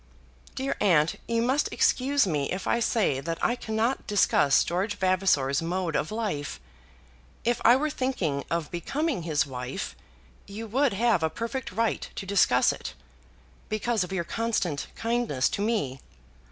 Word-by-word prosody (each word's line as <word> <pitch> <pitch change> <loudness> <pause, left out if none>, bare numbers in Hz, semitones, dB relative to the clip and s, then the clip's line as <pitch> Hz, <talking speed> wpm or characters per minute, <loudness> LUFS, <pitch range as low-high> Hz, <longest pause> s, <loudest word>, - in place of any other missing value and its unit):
"Dear 270 +1 -2
aunt, 165 -6 +3
you 230 0 +1
must 265 +4 +1
excuse 275 +1 +2
me 150 -6 -1
if 185 - -3
I 235 - +2
say 215 - +1
that 165 +4 -3
I 240 - +1
cannot 230 +2 -1
discuss 170 -8 +4
George 190 +5 -2
Vavasor's 185 -8 +2
mode 170 -1 -2
of 155 - -1
life. 210 -11 -3 0.8
If 240 0 0
I 240 - +7
were 300 +3 0
thinking 190 - -1
of 165 -3 -2
becoming 275 - -2
his 155 -3 +1
wife 125 -1 -5 0.5
you 210 +3 -6
would 260 +3 +1
have 225 -3 +2
a 160 - +1
perfect 235 - -4
right 225 +3 -1
to - - -5
discuss 185 -10 +4
it, - - -8 0.7
because 215 0 0
of 180 - -7
your 190 -3 -1
constant 200 -7 -1
kindness 230 - 0
to - - -3
me. 205 - -1
200 Hz, 155 wpm, -27 LUFS, 160-235 Hz, 0.8 s, I